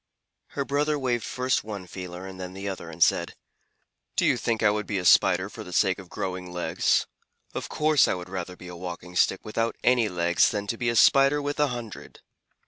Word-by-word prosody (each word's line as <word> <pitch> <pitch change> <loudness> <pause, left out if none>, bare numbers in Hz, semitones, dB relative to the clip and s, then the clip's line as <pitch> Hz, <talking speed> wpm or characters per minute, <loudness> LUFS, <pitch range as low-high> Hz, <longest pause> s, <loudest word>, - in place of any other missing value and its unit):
Her 140 - 0
brother 150 +2 0
waved 125 -4 -1
first 125 +4 -1
one 105 -3 -6
feeler 90 0 -8
and 95 -1 -9
then 90 0 -6
the 100 +1 -5
other, 95 -3 -5
and 85 +1 +2
said: - - +1 0.8
"Do - - +2
you - - +4
think 115 -1 -1
I 105 - +5
would 105 0 -3
be 100 - -1
a 90 - -3
Spider 95 +1 +5
for 110 +1 -9
the 90 - -10
sake 95 +1 +2
of 95 -2 -12
growing 90 -1 -5
legs? 90 0 +1 0.5
I 155 -7 +2
would 90 0 -7
rather 90 -1 -5
be 90 - -12
a 90 - -8
Walking 90 0 -8
Stick 95 - +2
without 115 +1 -1
any 120 -3 +3
legs 85 -1 +2
than 105 -1 -3
to 110 - -2
be 120 - +1
a 115 - -1
Spider 140 +4 +5
with 145 0 -3
a 150 - +4
hundred." 120 -4 -8
100 Hz, 210 wpm, -26 LUFS, 90-120 Hz, 0.8 s, I